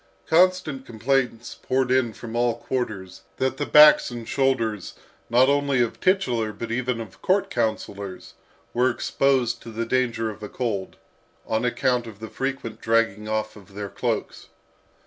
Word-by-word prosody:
Constant 175 -5 +2
complaints 120 0 -1
poured 130 -1 0
in 130 -3 +2
from 115 +1 -8
all 120 -1 +1
quarters, 110 -8 -4 0.2
that 130 0 -1
the 145 - -2
backs 150 0 +7
and 120 -2 -7
shoulders, 115 -8 0 0.3
not 125 +2 +5
only 140 -1 +2
of 120 -2 0
titular 125 - +1
but 110 +3 -6
even 125 0 -1
of 110 -5 -9
court 195 +1 +1
councillors, 100 -4 -3 0.4
were 125 +2 +3
exposed 130 -1 +1
to 115 - -10
the 115 +1 -3
danger 115 -2 0
of 110 - -13
a 105 - -6
cold, 105 -6 -3 0.5
on 110 +1 -1
account 125 -1 0
of 110 -3 -10
the 110 0 -7
frequent 130 -5 -4
dragging 110 -2 +1
off 110 0 -2
of 100 -1 -16
their 100 -1 -5
cloaks. - - -3
120 Hz, 155 wpm, -24 LUFS, 110-130 Hz, 0.5 s, backs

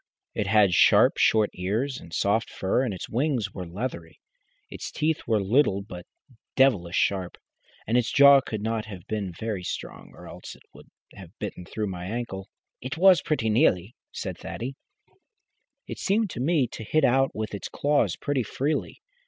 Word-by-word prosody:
It 105 - -2
had 100 -3 +4
sharp, - - +5
short 110 -2 +3
ears, 110 +9 -2
and 85 - -14
soft 100 +6 0
fur, 95 +6 0
and 130 -4 -1
its 95 - -6
wings 120 -5 -1
were 90 -2 -6
leathery. 85 -3 -6 0.5
Its - - -7
teeth 155 +1 -1
were 110 -2 +2
little 100 -1 +2
but 90 -4 -10 0.5
devilish 105 -11 +3
sharp, 95 -3 0 0.5
and 115 - -1
its 125 -1 +2
jaw 140 -1 +7
could 110 -4 -5
not 110 -1 -2
have 95 -5 -10
been 105 -4 -3
very 105 +2 -4
strong - - -6
or - - -12
else - - -10
it - - -21
would - - -15 0.3
have 95 0 -13
bitten 100 -3 -6
through 110 +4 -4
my 90 -1 -6
ankle." 100 -3 -5 0.3
"It 130 +4 -4
has 185 +1 +6
pretty 115 -8 0
nearly," 105 - +2 0.2
said - - -6
Thaddy. 130 +4 -6 1.1
"It - - -7
seemed 205 0 +1
to - - -6
me 145 +1 +2
to - - -8
hit 155 +7 +2
out 135 +2 +2
with 110 -1 -4
its 100 - -5
claws 145 0 +1
pretty 145 -2 -1
freely. 140 +7 -3
110 Hz, 175 wpm, -26 LUFS, 95-135 Hz, 1.1 s, jaw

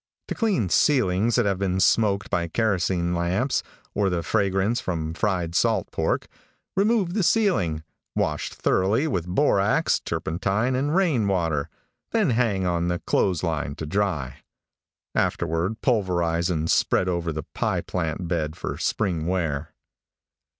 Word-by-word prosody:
To - - -1
clean 195 - 0
ceilings 115 - +3
that 120 - +3
have 100 -2 0
been 95 -1 0
smoked 100 0 +2
by 85 -4 0
kerosene 90 -3 0
lamps, 90 +10 0 0.3
or 100 -1 +1
the 85 -2 -1
fragrance 100 +4 +1
from 80 -5 -3
fried 90 -3 -1
salt - - +1
pork, - - -1 0.5
remove 200 -2 +2
the 210 - +1
ceiling, 170 - +2 0.3
wash 75 -1 -1
thoroughly 105 +11 +1
with 90 - -2
borax, 100 0 +2
turpentine 100 +9 -1
and 145 +5 0
rain 155 - +2
water, 80 -6 0 0.4
then 215 - +3
hang 110 -6 +1
on 85 -1 0
the 90 0 0
clothes 90 0 0
line 75 -4 -2
to 80 - -5
dry. 80 -8 -1 0.8
Afterward 85 +6 -1
pulverize 85 -7 +1
and 80 -2 -1
spread 90 - +2
over 85 -2 -1
the 75 -1 -4
pie - - 0
plant 85 0 -3
bed 80 -3 -2
for - - -5
spring 85 -7 -1
wear. 80 -5 -1
95 Hz, 140 wpm, -24 LUFS, 85-110 Hz, 0.8 s, ceilings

